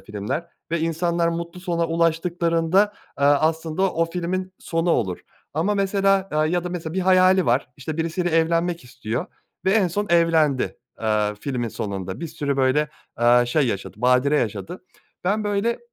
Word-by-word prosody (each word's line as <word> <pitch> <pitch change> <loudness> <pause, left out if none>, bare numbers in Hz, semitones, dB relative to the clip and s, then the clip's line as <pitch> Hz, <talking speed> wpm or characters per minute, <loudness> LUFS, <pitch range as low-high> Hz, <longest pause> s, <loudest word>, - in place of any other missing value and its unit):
filmler 105 +11 -4 0.2
ve 170 - 0
insanlar 170 +1 0
mutlu 170 +1 -4
sona 170 -2 -1
ulaştıklarında, 170 +3 +1 0.2
aaa, 140 +1 +4
aslında 160 +4 0
o 165 - +2
filmin 185 +2 -3
sonu 165 +1 -1
olur. 95 - 0 0.3
Ama 180 +7 +1
mesela 195 -1 +2
aaa, 155 +1 +2
ya 175 +2 0
da 180 - -2
mesela 165 -3 -5
bir 190 - 0
hayali 185 0 +4
var, 125 +2 +2
işte, 150 +3 -5
birisiyle 165 +2 -1
evlenmek 165 0 +1
istiyor 120 - -4 0.4
ve 190 - +3
en 200 -3 +3
son 205 +5 -2
evlendi. 160 -5 +3 0.2
Aaa, 105 -1 +1
filmin 125 -3 -2
sonunda. 95 - -5
Bir 170 - -3
sürü, 145 -3 -2
böyle, 135 +3 +2 0.3
aaa, 120 +1 +5
şey 140 +3 +2
yaşadı, 100 -5 -3
badire 125 +4 +3
yaşadı. 110 - -4 0.4
Ben, 210 +3 +1
böyle, 205 +3 0
165 Hz, 160 wpm, -23 LUFS, 135-180 Hz, 0.4 s, aaa